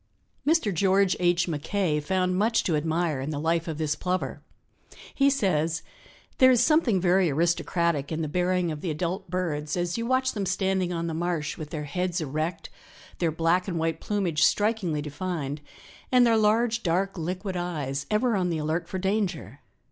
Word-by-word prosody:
Mr. 310 - +3
George 190 +2 +3
H. 175 0 +2
Mackay 160 +1 -1
found 185 +4 0
much 225 +4 +2
to 165 - +1
admire 160 -1 0
in 135 - -4
the 155 - -3
life 165 +2 0
of 160 -2 -4
this 155 -1 0
Plover. 185 0 -2 0.7
He 275 0 +4
says: 165 - 0 0.6
"There 260 - +8
is 245 -2 +5
something 290 - +3
very 180 0 +3
aristocratic 170 -1 0
in 160 0 -2
the - - -2
bearing 180 +1 0
of 150 -1 -6
the 180 - -3
adult 180 +4 -3
birds 155 -4 -2
as 175 +4 -1
you 230 - -2
watch 260 +1 +2
them 200 -3 -3
standing 190 -1 0
on 170 -1 -2
the 165 - -3
marsh 165 -2 -2
with 155 -2 -7
their 155 -2 -4
heads 180 +4 -2
erect, 155 +3 -3 0.5
their 170 -2 +1
black 165 +4 +1
and 175 -3 -2
white 165 0 -1
plumage 185 -7 -1
strikingly 205 -8 +1
defined, 150 -2 -4 0.5
and 250 -1 +6
their 230 -1 +4
large, 225 +2 +2
dark, 190 +2 0
liquid 185 +3 -4
eyes 150 -6 -3
ever 225 +2 +2
on 180 -2 0
the 165 - -1
alert 160 +3 -2
for 190 - -3
danger. 185 - -2
175 Hz, 180 wpm, -26 LUFS, 160-195 Hz, 0.7 s, There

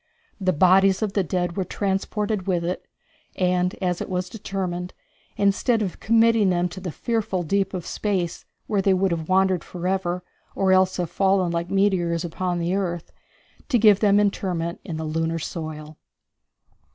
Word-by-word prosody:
The 185 -2 +2
bodies 190 +4 +4
of 205 -2 -2
the 200 - +2
dead 175 -1 -2
were 190 - 0
transported 200 +1 -2
with 175 -3 +1
it, 180 +2 -4 0.5
as 180 0 0
it - - -4
was 180 0 -2
determined, 185 -4 -4 0.4
instead 210 +3 +2
of 185 - -5
committing 225 -2 +4
them 180 0 +1
to 175 +2 -8
the 180 -2 -5
fearful 210 -3 -1
deep 195 +4 0
of 180 - -5
space, 185 -5 -2 0.2
where 205 -2 0
they 195 0 +3
would 190 0 +1
have 160 -1 -3
wandered 190 -1 +3
forever, 180 0 -2 0.3
or 190 -1 +2
else 185 0 +3
have 175 -3 -2
fallen 190 -2 +2
like 170 +1 -2
meteors 180 -4 +1
upon 175 +1 -2
the 170 +1 -1
earth, 175 -4 -2 0.6
to 255 - +4
give 210 -3 +6
them 205 -1 +4
interment 180 -4 -1
in 165 -3 -5
the 160 - -4
lunar 165 +1 -1
soil. 155 -2 -6
185 Hz, 165 wpm, -24 LUFS, 175-195 Hz, 0.6 s, give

